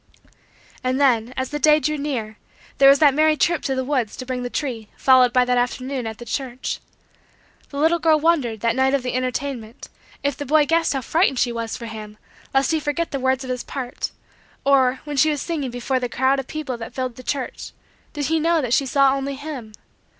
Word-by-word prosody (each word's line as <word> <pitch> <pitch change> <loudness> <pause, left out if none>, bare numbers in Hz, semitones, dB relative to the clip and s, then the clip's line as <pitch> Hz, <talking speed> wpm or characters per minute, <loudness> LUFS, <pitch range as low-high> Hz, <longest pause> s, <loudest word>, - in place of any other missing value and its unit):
And 255 +1 0
then, 245 -4 +3
as 260 0 -2
the 295 - -2
day 305 +1 +5
drew 305 0 -1
near, 250 -8 -4 0.4
there 275 0 +8
was 275 - +7
that 285 -2 +5
merry 310 +1 +3
trip 340 +4 +2
to 265 - -1
the 260 - -1
woods 255 -5 -1
to 255 - -6
bring 255 -1 -3
the 245 - -3
tree, 245 -6 -4
followed 255 -2 +5
by 250 0 +3
that 250 0 +2
afternoon 255 0 -2
at 220 -1 -6
the 240 - -10
church. 255 +1 -4 0.9
The 280 - -8
little 325 +4 +3
girl 315 -1 +4
wondered, 285 -10 +1
that 230 -1 +1
night 265 +1 +3
of 270 - -1
the 250 - -3
entertainment, 255 -1 -4 0.3
if 285 -2 0
the 290 - -5
boy 300 +2 +3
guessed 330 +1 +2
how 270 - -1
frightened 315 +2 +1
she 245 0 +2
was 230 -1 -4
for 235 - -8
him 215 -1 -8 0.3
lest 270 +1 +2
he 320 - +2
forget 305 +3 -2
the 275 - -2
words 260 0 +1
of 255 - -4
his 250 -1 -3
part; 255 -3 -5 0.6
or, 265 -2 +3
when 295 -1 -5
she 310 +3 +5
was 295 -2 -1
singing 305 -6 -3
before 245 +2 -1
the 245 -1 -3
crowd 265 +3 +2
of 265 - -5
people 300 -5 -4
that 230 -1 -8
filled 255 -2 -3
the 255 - -10
church, 260 0 -4 0.4
did 295 -2 -2
he 320 +2 +1
know 330 +1 +2
that 250 -5 -1
she 275 - +2
saw 275 +1 +4
only 275 0 -3
him? 275 -6 -7
265 Hz, 225 wpm, -22 LUFS, 245-290 Hz, 0.9 s, there